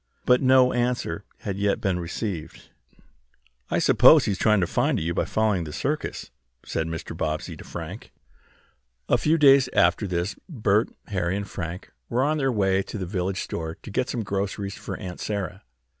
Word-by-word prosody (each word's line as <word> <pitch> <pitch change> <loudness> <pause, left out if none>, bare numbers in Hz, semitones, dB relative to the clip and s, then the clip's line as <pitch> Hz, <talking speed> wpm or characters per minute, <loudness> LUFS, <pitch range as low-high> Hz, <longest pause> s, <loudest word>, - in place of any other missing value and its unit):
But 125 0 +4
no 130 -1 +5
answer 120 -7 -1 0.2
had 100 -2 -4
yet 100 +2 +1
been 95 -5 0
received. 85 0 -5 1.0
"I - - +1
suppose 130 +6 +6
he 105 - +1
is 95 - -3
trying 105 -2 +4
to - - +3
find - - +1
you 85 +2 -1
by - - 0
following 110 -3 +1
up - - -4
the 75 - -7
circus," - - -3 0.3
said 80 - -2
Mr. 80 0 -5
Bobbsey 75 -1 -3
to - - -10
Frank. - - -8 1.0
A - - +3
few 160 +2 +3
days 135 -3 +6
after 105 - +3
this 90 +2 -2
Bert, 110 - +1 0.2
Harry 95 -2 -1
and 100 -1 -4
Frank 90 -1 -6 0.2
were 125 +2 +1
on 155 +2 +1
their 135 -2 +1
way 95 -4 +2
to 100 - -7
the 95 - -3
village 95 0 -2
store 80 0 -4
to 110 - -8
get 125 - -1
some 115 - -2
groceries 100 0 -3
for - - -6
Aunt 90 -3 -7
Sarah. 100 -2 -4
100 Hz, 185 wpm, -25 LUFS, 90-120 Hz, 1.0 s, suppose